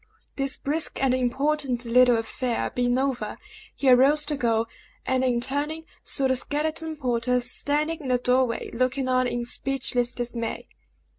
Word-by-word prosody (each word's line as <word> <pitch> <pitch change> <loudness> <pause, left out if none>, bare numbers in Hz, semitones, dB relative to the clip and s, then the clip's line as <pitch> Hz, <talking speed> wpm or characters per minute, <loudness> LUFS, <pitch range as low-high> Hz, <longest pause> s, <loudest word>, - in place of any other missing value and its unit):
This 275 0 -1
brisk 305 +3 0
and 265 -2 +2
important 255 0 0
little 245 0 +5
affair 235 +1 -2
being 245 0 +1
over, 260 -6 -2 0.4
he 275 - -2
arose 275 +4 +5
to 295 0 -1
go, 230 -4 +1 0.4
and 260 0 +1
in 245 -2 +2
turning, 290 +5 -2 0.2
saw 270 -2 0
the 260 - +2
skeleton 310 +4 -2
porter 250 -3 0
standing 295 +6 -1
in 280 - -7
the 250 -1 +3
door 250 +1 +3
way, 230 - -5
looking 255 +2 0
on 255 0 +2
in 240 -1 -2
speechless 245 -1 -1
dismay. 240 -2 -4
255 Hz, 155 wpm, -25 LUFS, 245-285 Hz, 0.4 s, little